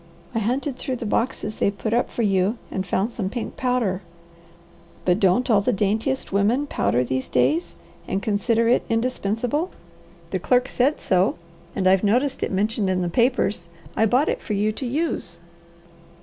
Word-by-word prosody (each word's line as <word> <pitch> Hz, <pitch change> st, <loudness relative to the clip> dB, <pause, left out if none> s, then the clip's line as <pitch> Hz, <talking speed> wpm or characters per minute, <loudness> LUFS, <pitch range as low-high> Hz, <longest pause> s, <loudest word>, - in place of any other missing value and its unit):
I 225 Hz, -, 0 dB
hunted 255 Hz, +5 st, -1 dB
through 260 Hz, -, -2 dB
the 235 Hz, -, -5 dB
boxes 215 Hz, -1 st, -1 dB
they -, -, +2 dB
put 215 Hz, +2 st, -3 dB
up 240 Hz, -, +1 dB
for 235 Hz, -, -2 dB
you 195 Hz, +2 st, +2 dB
and 190 Hz, 0 st, -3 dB
found 195 Hz, +6 st, 0 dB
some 195 Hz, -4 st, -2 dB
pink 235 Hz, +2 st, -5 dB
powder 245 Hz, -7 st, 0 dB, 0.5 s
" 170 Hz, 0 st, -27 dB
"But 180 Hz, +2 st, +3 dB
don't 195 Hz, +6 st, +3 dB
all 215 Hz, -5 st, +4 dB
the 225 Hz, -, +1 dB
daintiest 220 Hz, +5 st, -1 dB
women 220 Hz, +8 st, +2 dB
powder 120 Hz, -, +1 dB
these 130 Hz, +1 st, -2 dB
days, 135 Hz, +7 st, +1 dB, 0.3 s
and 190 Hz, -, -1 dB
consider 220 Hz, +3 st, +1 dB
it 240 Hz, -, +4 dB
indispensable? 245 Hz, -, -1 dB, 0.6 s
The -, -, -1 dB
clerk 250 Hz, 0 st, +2 dB
said 270 Hz, +5 st, +1 dB
so, 185 Hz, +1 st, +2 dB, 0.4 s
and 185 Hz, -, +1 dB
I've 190 Hz, +1 st, +4 dB
noticed 250 Hz, +7 st, +1 dB
it -, -, -1 dB
mentioned 205 Hz, +1 st, 0 dB
in 185 Hz, -1 st, +1 dB
the 175 Hz, -, -1 dB
papers. 215 Hz, -4 st, +1 dB, 0.3 s
I 220 Hz, -, +3 dB
bought 255 Hz, +8 st, +3 dB
it -, -, -1 dB
for 215 Hz, -, -4 dB
you 210 Hz, +1 st, +1 dB
to 250 Hz, +4 st, -5 dB
use." 255 Hz, -, -2 dB
215 Hz, 180 wpm, -23 LUFS, 190-250 Hz, 0.6 s, all